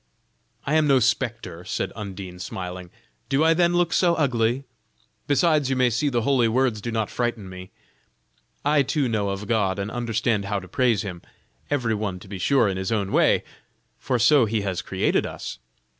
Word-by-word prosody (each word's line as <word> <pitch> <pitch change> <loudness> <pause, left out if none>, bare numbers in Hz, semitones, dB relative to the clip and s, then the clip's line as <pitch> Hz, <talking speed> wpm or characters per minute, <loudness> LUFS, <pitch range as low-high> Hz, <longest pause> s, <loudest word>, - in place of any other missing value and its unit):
"I 150 - -1
am 155 -1 +4
no 135 -2 +5
spectre," 115 -7 -1
said - - -3
Undine, 95 -4 -7
smiling; 90 0 -6 0.4
"do 135 +3 +2
I 165 0 +5
then 175 +1 +2
look 175 -1 +2
so 175 -2 +3
ugly? 125 -3 +1 0.6
Besides 145 -1 +3
you 135 - +1
may 125 -1 +3
see 130 +6 +1
the 120 -4 0
holy 130 -2 +3
words 120 -2 +1
do 120 - -4
not 110 -3 -1
frighten 120 -5 -2
me. 95 0 -9 1.0
I 145 0 +4
too 140 0 0
know 105 -4 0
of 100 +1 -4
God 100 -3 +1
and 100 +2 -3
understand 115 -3 -1
how 100 0 -1
to 95 - -11
praise 120 -1 +1
Him; 90 -4 -6 0.5
every 125 -6 0
one 105 -3 -2
to - - -12
be 95 -1 -7
sure 130 +3 +3
in 95 -1 -2
his 95 +2 -3
own 100 -3 -1
way, - - +3 0.6
for 130 -2 0
so 120 +3 +5
He 110 0 -1
has 95 -2 -2
created 95 0 0
us. - - -7
115 Hz, 190 wpm, -24 LUFS, 100-135 Hz, 1.0 s, no